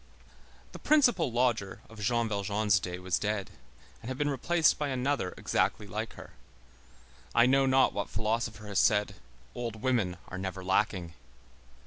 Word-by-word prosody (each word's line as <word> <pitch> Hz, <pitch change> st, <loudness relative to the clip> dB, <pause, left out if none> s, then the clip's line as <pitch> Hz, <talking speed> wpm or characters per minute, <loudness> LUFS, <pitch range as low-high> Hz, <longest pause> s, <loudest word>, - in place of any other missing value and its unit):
The -, -, -10 dB
"principal 245 Hz, -, +3 dB
lodger" 120 Hz, -5 st, 0 dB
of 115 Hz, -1 st, -14 dB
Jean 115 Hz, +1 st, +1 dB
Valjean's 100 Hz, -1 st, +1 dB
day 90 Hz, 0 st, -5 dB
was 90 Hz, -1 st, -1 dB
dead 105 Hz, -2 st, -2 dB, 0.5 s
and 115 Hz, -, -7 dB
had 130 Hz, -, -4 dB
been 145 Hz, 0 st, 0 dB
replaced 160 Hz, +4 st, +2 dB
by 150 Hz, -, 0 dB
another 130 Hz, -6 st, -1 dB
exactly -, -, 0 dB
like -, -, -5 dB
her. -, -, -12 dB, 1.0 s
I 120 Hz, 0 st, +6 dB
know 135 Hz, +1 st, +4 dB
not 130 Hz, 0 st, +4 dB
what 100 Hz, -, -3 dB
philosopher 110 Hz, 0 st, -2 dB
has 100 Hz, -2 st, 0 dB
said: 105 Hz, -2 st, +3 dB, 0.4 s
"Old 115 Hz, -3 st, -5 dB
women 115 Hz, -9 st, +1 dB
are 90 Hz, -, -6 dB
never 95 Hz, 0 st, -5 dB
lacking." 95 Hz, -3 st, 0 dB
110 Hz, 150 wpm, -30 LUFS, 100-130 Hz, 1.0 s, I